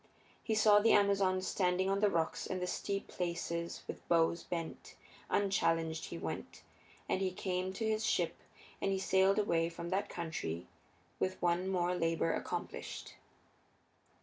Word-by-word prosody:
He 220 Hz, -, 0 dB
saw 210 Hz, -1 st, +6 dB
the 225 Hz, +2 st, +5 dB
Amazons 195 Hz, -2 st, +3 dB
standing 185 Hz, 0 st, +1 dB
on 195 Hz, +1 st, +1 dB
the 210 Hz, 0 st, +4 dB
rocks 165 Hz, -3 st, -1 dB
and 185 Hz, -, -2 dB
the 180 Hz, -, -1 dB
steep 195 Hz, +2 st, -2 dB
places 170 Hz, -1 st, -3 dB
with -, -, -7 dB
bows 170 Hz, 0 st, +3 dB
bent; 170 Hz, -2 st, -5 dB, 0.3 s
unchallenged 165 Hz, -5 st, +1 dB
he -, -, -6 dB
went -, -, -6 dB, 0.4 s
on, -, -, 0 dB
and 185 Hz, -, 0 dB
he 190 Hz, -, +2 dB
came 185 Hz, 0 st, -2 dB
to 220 Hz, +4 st, -3 dB
his 220 Hz, 0 st, +1 dB
ship -, -, +1 dB, 0.4 s
and 195 Hz, -, +1 dB
he 195 Hz, -, +1 dB
sailed 190 Hz, +1 st, +3 dB
away 170 Hz, -5 st, +2 dB
from 170 Hz, 0 st, -6 dB
that 195 Hz, +2 st, 0 dB
country 150 Hz, -, -4 dB, 0.5 s
with 185 Hz, 0 st, -1 dB
one 175 Hz, +1 st, +1 dB
more 180 Hz, -2 st, +1 dB
labor 165 Hz, -, +1 dB
accomplished. -, -, -5 dB
185 Hz, 155 wpm, -34 LUFS, 170-195 Hz, 0.5 s, saw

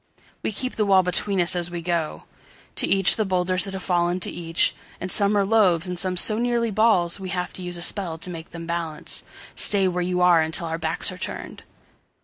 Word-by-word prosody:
We -, -, -2 dB
keep 255 Hz, +5 st, -3 dB
the 215 Hz, -, +1 dB
wall 190 Hz, -1 st, +5 dB
between 185 Hz, +2 st, 0 dB
us 175 Hz, 0 st, +3 dB
as 175 Hz, -1 st, -1 dB
we 175 Hz, -1 st, -6 dB
go. 170 Hz, -3 st, -2 dB, 0.5 s
To -, -, +4 dB
each 195 Hz, -2 st, +4 dB
the 220 Hz, -, +1 dB
boulders 185 Hz, -1 st, 0 dB
that 195 Hz, -1 st, -6 dB
have 190 Hz, -, -6 dB
fallen 175 Hz, 0 st, 0 dB
to -, -, +1 dB
each. 165 Hz, -1 st, 0 dB, 0.3 s
And 185 Hz, -, -4 dB
some 205 Hz, 0 st, +4 dB
are 200 Hz, -, +2 dB
loaves 195 Hz, -6 st, +3 dB
and 180 Hz, -1 st, -3 dB
some 185 Hz, -1 st, +1 dB
so 215 Hz, +4 st, +3 dB
nearly 235 Hz, -1 st, 0 dB
ballsWe 195 Hz, -3 st, +1 dB
have 180 Hz, -1 st, -3 dB
to -, -, -9 dB
use 180 Hz, -1 st, -5 dB
a 170 Hz, -, 0 dB
spell 175 Hz, -4 st, +1 dB
to 165 Hz, -, -6 dB
make 165 Hz, -1 st, -8 dB
them 170 Hz, -1 st, -8 dB
balance:"Stay 170 Hz, +4 st, -1 dB
where 180 Hz, -1 st, -1 dB
you 180 Hz, 0 st, -1 dB
are 175 Hz, -2 st, +5 dB
until 160 Hz, +2 st, 0 dB
our 165 Hz, 0 st, -4 dB
backs 160 Hz, +4 st, -1 dB
are 185 Hz, -, -10 dB
turned!" -, -, -6 dB
180 Hz, 215 wpm, -23 LUFS, 170-195 Hz, 0.5 s, wall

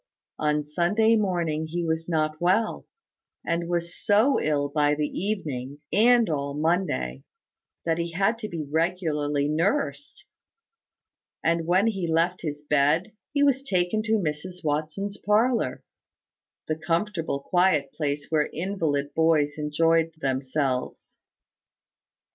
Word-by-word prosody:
On 150 Hz, -1 st, +1 dB
Sunday 200 Hz, +9 st, +2 dB
morning 170 Hz, -7 st, 0 dB
he 170 Hz, +2 st, -3 dB
was 160 Hz, +1 st, -2 dB
not 155 Hz, -1 st, 0 dB
well; 190 Hz, +6 st, +1 dB, 0.6 s
and 170 Hz, 0 st, -1 dB
was 170 Hz, 0 st, -2 dB
so 225 Hz, +6 st, +3 dB
ill 145 Hz, -2 st, +1 dB
by 145 Hz, 0 st, +2 dB
the 150 Hz, 0 st, 0 dB
evening, 145 Hz, -10 st, -4 dB
and 235 Hz, +2 st, +5 dB
all 140 Hz, -3 st, -2 dB
Monday, 150 Hz, -, 0 dB, 0.6 s
that 165 Hz, 0 st, 0 dB
he 170 Hz, 0 st, -3 dB
had 200 Hz, +6 st, +1 dB
to 215 Hz, -2 st, -5 dB
be 165 Hz, -3 st, -4 dB
regularly 150 Hz, -2 st, 0 dB
nursed; 205 Hz, -, -1 dB, 1.2 s
and 165 Hz, 0 st, +1 dB
when 185 Hz, +4 st, +3 dB
he 195 Hz, -6 st, -1 dB
left 170 Hz, +3 st, +1 dB
his 150 Hz, -2 st, -5 dB
bed, 150 Hz, +7 st, +2 dB, 0.2 s
he 285 Hz, -1 st, +2 dB
was 275 Hz, -2 st, +3 dB
taken 195 Hz, -4 st, 0 dB
to 220 Hz, 0 st, -1 dB
Mrs 180 Hz, -2 st, -2 dB
Watson's 155 Hz, +7 st, -2 dB
parlour, 225 Hz, +4 st, +1 dB, 0.8 s
the 155 Hz, -, 0 dB
comfortable, 165 Hz, -2 st, -1 dB
quiet 155 Hz, -3 st, +1 dB
place 145 Hz, -1 st, -3 dB
where 150 Hz, -2 st, +2 dB
invalid 155 Hz, -5 st, -2 dB
boys 155 Hz, -3 st, +2 dB
enjoyed 165 Hz, +2 st, +2 dB
themselves. 130 Hz, -1 st, -2 dB
165 Hz, 125 wpm, -26 LUFS, 150-190 Hz, 1.2 s, and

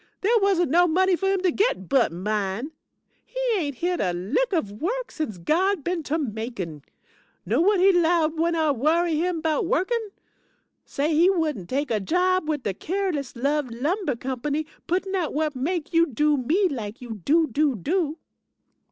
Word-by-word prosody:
There 455 Hz, +4 st, +3 dB
wasn't 365 Hz, -7 st, +2 dB
no 350 Hz, +2 st, +5 dB
money 370 Hz, +3 st, +3 dB
for 385 Hz, +3 st, -2 dB
him 390 Hz, -1 st, +1 dB
to 365 Hz, -2 st, +2 dB
git 355 Hz, -, 0 dB
but 270 Hz, -9 st, +3 dB
mine. 205 Hz, -, -2 dB, 0.5 s
He -, -, -8 dB, 0.2 s
ain't 295 Hz, -8 st, -2 dB
hit 350 Hz, +6 st, -1 dB
a 180 Hz, -3 st, 0 dB
lick 215 Hz, -, -1 dB
of 210 Hz, -, -2 dB
work 485 Hz, +9 st, -2 dB
since 245 Hz, -, -4 dB
God 350 Hz, -, +1 dB
been 350 Hz, +1 st, -1 dB
to 310 Hz, +1 st, -2 dB
Macon. 220 Hz, -, -5 dB, 0.6 s
Know -, -, +1 dB
whut 400 Hz, 0 st, +3 dB
he 385 Hz, +2 st, +6 dB
'lowed 335 Hz, -3 st, +2 dB
when 335 Hz, +1 st, +1 dB
I 315 Hz, -2 st, +2 dB
worry 315 Hz, +5 st, +1 dB
him 340 Hz, 0 st, -1 dB
'bout 320 Hz, +1 st, 0 dB
workin'? 435 Hz, +6 st, 0 dB, 0.8 s
Says 295 Hz, +3 st, -1 dB
he 330 Hz, +4 st, +5 dB
wouldn't 305 Hz, -, -1 dB
take 280 Hz, 0 st, -1 dB
a 220 Hz, -, +1 dB
job 360 Hz, -, +1 dB
wid 295 Hz, -4 st, -1 dB
de 200 Hz, -, -1 dB
Careless 335 Hz, -, -3 dB
Love 280 Hz, +2 st, 0 dB
Lumber 290 Hz, -, -1 dB
Company, 265 Hz, +5 st, -3 dB, 0.2 s
puttin' 375 Hz, +3 st, -1 dB
out 360 Hz, -5 st, -1 dB
whut 305 Hz, 0 st, -1 dB
make 320 Hz, +6 st, -2 dB
you 335 Hz, 0 st, +4 dB
do 295 Hz, +4 st, +2 dB
me 315 Hz, +10 st, +2 dB
lak 225 Hz, -, -5 dB
you 225 Hz, -5 st, -8 dB
do, 320 Hz, -, +4 dB
do, 290 Hz, 0 st, +1 dB
do. 315 Hz, -, -1 dB
310 Hz, 180 wpm, -24 LUFS, 255-360 Hz, 0.8 s, he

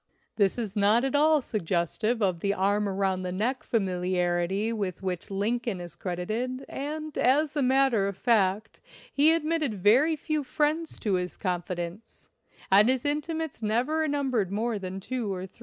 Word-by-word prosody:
This 200 Hz, 0 st, +2 dB
is 220 Hz, -4 st, -4 dB
not 210 Hz, +4 st, +3 dB
at 270 Hz, +1 st, 0 dB
all 305 Hz, +1 st, +4 dB
suggestive 215 Hz, +3 st, -1 dB
of 185 Hz, -4 st, +1 dB
the 200 Hz, +3 st, 0 dB
arm 205 Hz, +2 st, +1 dB
around 190 Hz, -1 st, 0 dB
the 180 Hz, -1 st, -3 dB
neck 230 Hz, +8 st, -1 dB
familiarity 185 Hz, 0 st, 0 dB
with 195 Hz, -4 st, -4 dB
which 180 Hz, -2 st, -3 dB
Lincoln 215 Hz, +1 st, -1 dB
is 175 Hz, -2 st, -8 dB
credited, 220 Hz, +9 st, -3 dB
and, 305 Hz, +2 st, -5 dB
as 290 Hz, +4 st, +2 dB
a 290 Hz, -, +1 dB
matter 260 Hz, -5 st, +3 dB
of 200 Hz, -1 st, -5 dB
fact, 215 Hz, -2 st, +1 dB, 0.3 s
he 295 Hz, +3 st, +5 dB
admitted 315 Hz, -6 st, 0 dB
very 240 Hz, -, +4 dB
few 305 Hz, 0 st, -2 dB
friends 305 Hz, +4 st, 0 dB
to 210 Hz, -4 st, 0 dB
his 180 Hz, -1 st, -2 dB
confidence, 180 Hz, +2 st, -5 dB, 0.4 s
and 205 Hz, +4 st, +6 dB
his 260 Hz, -1 st, +1 dB
inti 300 Hz, +3 st, -1 dB
mates 320 Hz, -7 st, -5 dB
never 255 Hz, +9 st, 0 dB
numbered 260 Hz, -9 st, 0 dB
more 220 Hz, +1 st, -1 dB
than 190 Hz, 0 st, -5 dB
two 230 Hz, 0 st, -3 dB
or 185 Hz, -1 st, -4 dB
three. 190 Hz, -, -18 dB
215 Hz, 165 wpm, -27 LUFS, 190-270 Hz, 0.4 s, and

